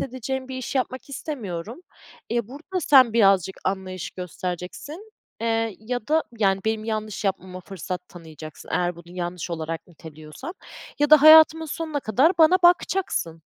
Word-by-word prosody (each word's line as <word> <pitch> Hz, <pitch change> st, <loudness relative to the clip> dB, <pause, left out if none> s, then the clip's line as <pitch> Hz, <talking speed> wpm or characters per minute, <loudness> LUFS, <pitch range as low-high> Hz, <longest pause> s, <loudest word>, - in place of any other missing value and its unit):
edeceğim 260 Hz, +1 st, -4 dB
bir 260 Hz, -, -6 dB
işi 260 Hz, +2 st, -2 dB
yapmak 255 Hz, +1 st, -4 dB
istemiyorum. 230 Hz, -, -6 dB, 0.5 s
E, 235 Hz, -2 st, -1 dB
burada 325 Hz, +7 st, -5 dB
sen 260 Hz, -6 st, +6 dB
birazcık 195 Hz, -4 st, +3 dB
anlayış 185 Hz, -2 st, -3 dB
göstereceksin, 185 Hz, -, -7 dB, 0.3 s
eee, 225 Hz, -2 st, -1 dB
ya 240 Hz, +2 st, -5 dB
da, 315 Hz, +1 st, +3 dB, 0.2 s
yani, 195 Hz, -2 st, +2 dB
benim 220 Hz, 0 st, -1 dB
yanlış 215 Hz, -1 st, -4 dB
yapmama 185 Hz, -1 st, -3 dB
fırsat 180 Hz, 0 st, -7 dB
tanıyacaksın 160 Hz, -3 st, -12 dB
eğer 175 Hz, -1 st, 0 dB
bunu 175 Hz, +1 st, -13 dB
yanlış 175 Hz, 0 st, -4 dB
olarak 165 Hz, -1 st, -5 dB
niteliyorsan 160 Hz, -, -11 dB, 0.4 s
ya 295 Hz, 0 st, +1 dB
da 305 Hz, -2 st, +8 dB
hayatımın 315 Hz, +1 st, +8 dB
sonuna 310 Hz, -1 st, -4 dB
kadar 265 Hz, -, +3 dB
bana 330 Hz, +3 st, +6 dB
bakacaksın. 345 Hz, -, +1 dB
220 Hz, 140 wpm, -24 LUFS, 180-285 Hz, 0.5 s, da